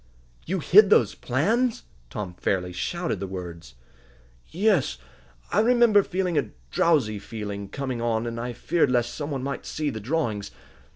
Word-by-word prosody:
"You 190 +4 0
hid 200 +6 +7
those 120 - +4
plans!" 220 - 0 0.3
Tom 95 +1 -5
fairly 90 0 -1
shouted 170 - -2
the 95 - -4
words. 85 -8 -8 0.7
"Yes, 185 - +1 0.5
I - - +3
remember 235 -3 +5
feeling 180 -4 0
a 120 -7 -3 0.2
drowsy 130 -11 +2
feeling 100 -2 -6
coming 130 -4 -4
on, 115 -1 0
and 115 0 -4
I 120 +1 -3
feared 160 +4 +1
lest 120 -1 +1
some 145 -1 -5
one 135 -3 -3
might 140 +1 -4
see 150 -2 -2
the 110 - -5
drawings. 110 -5 -2
125 Hz, 155 wpm, -25 LUFS, 105-170 Hz, 0.7 s, hid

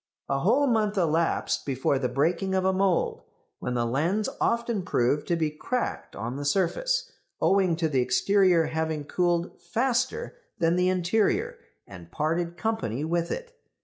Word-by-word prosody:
A 135 - 0
whole 245 - +3
month 215 -5 +1
elapsed 165 -2 +1
before 135 0 0
the 125 -2 -1
breaking 170 +8 0
of 185 0 +1
a 190 - +3
mould, 190 -2 +1 0.4
when 125 - -3
the 120 -1 +1
lens 165 - 0
often 235 -3 +1
proved 140 -3 0
to 175 - +2
be 160 -2 0
cracked 245 +11 -3
on 115 +6 -4
the 145 - -4
surface, 195 - 0 0.3
owing 190 -3 +3
to 160 0 0
the 135 -4 +1
exterior 180 +6 +3
having 160 -1 -2
cooled 175 +2 -1
faster 260 - -1 0.2
than 165 +1 +2
the 180 0 +2
interior 185 +4 +1 0.3
and 90 -3 -12
parted 170 +3 -1
company 145 - -2
with 170 +1 -1
it. 485 0 -6
170 Hz, 155 wpm, -26 LUFS, 145-200 Hz, 0.4 s, whole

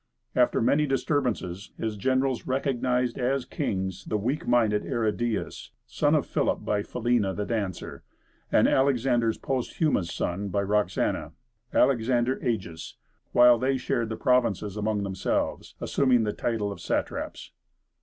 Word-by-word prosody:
After 125 -1 +3
many 150 +5 +3
disturbances, 125 - -1
his 110 -1 -2
generals 130 +3 0
recognized 125 -2 0
as 130 +1 0
Kings 95 - -3
the 105 - -1
weak 135 +11 -2
minded 110 -4 +3
Aridæus 115 -1 -2
a - - -39
son - - +1
of - - +1
Philip - - -1
by 105 -1 +1
Philinna, 115 -4 0
the 105 - -2
dancer 100 -6 -4 0.5
and - - +5
Alexander's 125 -4 +2
posthumous 130 - -1
son 100 +3 -2
by 100 +1 0
Roxana, 100 -1 0 0.4
Alexander 125 0 +2
Ægus, 95 -9 -4 0.4
while 120 -1 +6
they 130 +2 +1
shared 115 -3 -1
the 110 - -3
provinces 110 -6 +1
among 105 -1 -1
themselves, 95 -1 -2
assuming 125 -4 +2
the 105 -1 -1
title 110 -4 -1
of 100 - -8
satraps. - - -3
115 Hz, 135 wpm, -27 LUFS, 105-130 Hz, 0.5 s, while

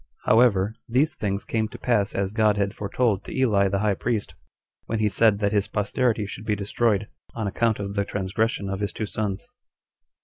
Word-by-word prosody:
However, 110 -3 +4 0.2
these 135 +7 +2
things 100 -1 -3
came 110 -1 0
to - - -10
pass 105 -5 0
as 100 0 -1
God 110 -2 +3
had 100 0 0
foretold 105 0 0
to - - -7
Eli 105 -7 +3
the 100 0 0
high 105 -1 +2
priest, 110 +1 -2 0.5
when 115 - -1
he 110 0 +2
said 105 +1 +3
that 100 -1 +2
his 105 -2 +1
posterity 110 +2 0
should 105 +2 -8
be 105 - +2
destroyed, 105 +1 0 0.3
on 110 - -2
account 110 +2 +1
of 100 -1 -4
the 100 0 +1
transgression 100 +2 -1
of 95 0 -3
his 100 -1 -2
two 110 - -3
sons. 100 -2 -3
105 Hz, 195 wpm, -25 LUFS, 100-110 Hz, 0.5 s, However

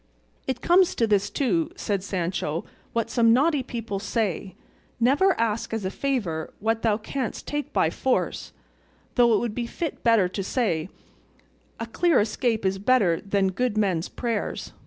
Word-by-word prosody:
"It 265 - -2
comes 360 +1 +4
to 230 - +2
this, 205 -2 +2
too," 310 +4 0
said 200 - -2
Sancho, 175 -4 -2 0.3
"what 230 -1 -1
some 230 -2 +4
naughty 290 +3 +3
people 230 -5 -4
say, 200 -3 -2 0.4
'Never 285 +10 +3
ask 225 0 0
as 215 -4 -3
a 185 - -1
favour 205 - -2
what 225 +2 0
thou 220 -2 +2
canst 240 +2 -4
take 295 0 -3
by - - +2
force;' - - -1 0.6
though 240 -2 +4
it - - +3
would 235 0 -3
fit 330 -3 -4
better 230 -5 +4
to 195 +2 -4
say, 190 -7 -1 0.9
'A 230 - -3
clear 335 +9 +2
escape 220 0 0
is 190 0 0
better 200 -6 +3
than 200 -1 +1
good 225 +3 -1
men's 190 -5 +1
prayers. 230 -4 -3
225 Hz, 155 wpm, -25 LUFS, 195-250 Hz, 0.9 s, comes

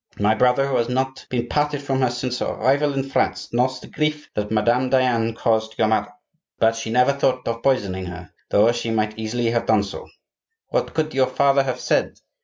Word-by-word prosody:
My 105 +1 +3
brother, 125 +4 +3
who 135 -2 0
has 120 0 0
not 130 +1 -2
been 120 -1 -2
parted 150 +2 0
from 135 -2 -2
her 130 - +3
since 125 +1 -3
her - - -1
arrival 140 +2 +1
in 135 0 -2
France, 135 - -1
knows 130 +2 +1
the - - -12
grief 150 -1 -3
that 105 0 -3
Madame 120 +4 +1
Diane 120 -3 +2
caused 110 -1 0
your 110 - +2
mother. 110 - 0 0.5
But 115 0 +3
she 115 0 -5
never 125 +4 +3
thought 130 -2 0
of 115 0 -2
poisoning 100 -9 0
her, 90 -1 -9 0.2
though 110 +3 +4
she 120 -1 -3
might 110 -1 -1
easily 115 +1 -1
have 115 0 -1
done 110 -2 +3
so. 100 - -8 0.6
What - - -1
could 155 -1 -1
your 130 -1 +3
father 140 +1 +3
have 130 -2 -3
said? - - 0
125 Hz, 205 wpm, -22 LUFS, 110-135 Hz, 0.6 s, though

